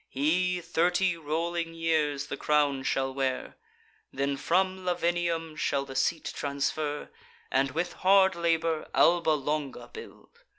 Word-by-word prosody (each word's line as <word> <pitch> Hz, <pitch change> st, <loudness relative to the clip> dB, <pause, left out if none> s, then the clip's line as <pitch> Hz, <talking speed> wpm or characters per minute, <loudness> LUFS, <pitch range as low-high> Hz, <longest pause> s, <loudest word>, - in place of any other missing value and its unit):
He 180 Hz, +6 st, +1 dB
thirty 175 Hz, +2 st, +1 dB
rolling 165 Hz, +2 st, -3 dB
years 155 Hz, -4 st, 0 dB
the -, -, -5 dB
crown 145 Hz, -3 st, +1 dB
shall 135 Hz, 0 st, -1 dB
wear, 130 Hz, -1 st, -2 dB, 0.6 s
Then 140 Hz, +1 st, -1 dB
from 185 Hz, +5 st, 0 dB
Lavinium 170 Hz, -2 st, -1 dB
shall 140 Hz, -2 st, -1 dB
the 135 Hz, -1 st, -9 dB
seat 160 Hz, +3 st, 0 dB
transfer, 145 Hz, +1 st, -2 dB, 0.4 s
And, 135 Hz, +1 st, +2 dB
with 165 Hz, +6 st, -2 dB
hard 190 Hz, 0 st, +4 dB
labour, 165 Hz, -2 st, 0 dB
Alba 170 Hz, -1 st, +4 dB
Longa 150 Hz, -1 st, -3 dB
build. 455 Hz, +1 st, -12 dB
165 Hz, 125 wpm, -28 LUFS, 140-175 Hz, 0.6 s, hard